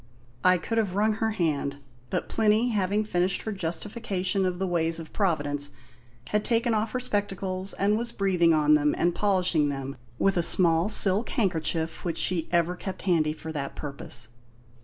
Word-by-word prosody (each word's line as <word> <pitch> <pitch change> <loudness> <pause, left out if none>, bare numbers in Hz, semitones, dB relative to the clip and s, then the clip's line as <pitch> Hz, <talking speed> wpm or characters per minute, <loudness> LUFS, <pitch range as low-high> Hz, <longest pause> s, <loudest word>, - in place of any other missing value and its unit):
I 185 0 +5
could 225 +7 -2
have 200 -4 -1
wrung 215 +2 +2
her 225 - +2
hand; 155 -8 -1 0.3
but - - -2
Plinny, 220 +2 +2
having 205 -1 0
finished 180 -1 -1
her 220 - -4
justification 190 +1 -2
of 180 -1 -3
the 190 - -2
ways 165 -2 0
of 160 - -10
Providence, 145 -7 -1 0.6
had 210 0 0
taken 230 0 +1
off 215 0 -1
her 255 - -1
spectacles 195 -5 -3
and 205 +2 +1
was 235 0 -4
breathing 180 -5 +2
on 150 -1 +3
them 150 -1 +2
and 175 0 +1
polishing 180 -6 +1
them 135 -1 -5 0.2
with 195 +6 +1
a - - +3
small 170 +1 +4
silk 205 +1 +6
handkerchief 165 -5 -1
which 165 -2 -3
she 170 -3 0
ever 175 0 +1
kept 190 +1 -7
handy 165 -5 +2
for 160 +1 -8
that 140 -3 -5
purpose. 140 -5 -2
185 Hz, 175 wpm, -26 LUFS, 160-205 Hz, 0.6 s, silk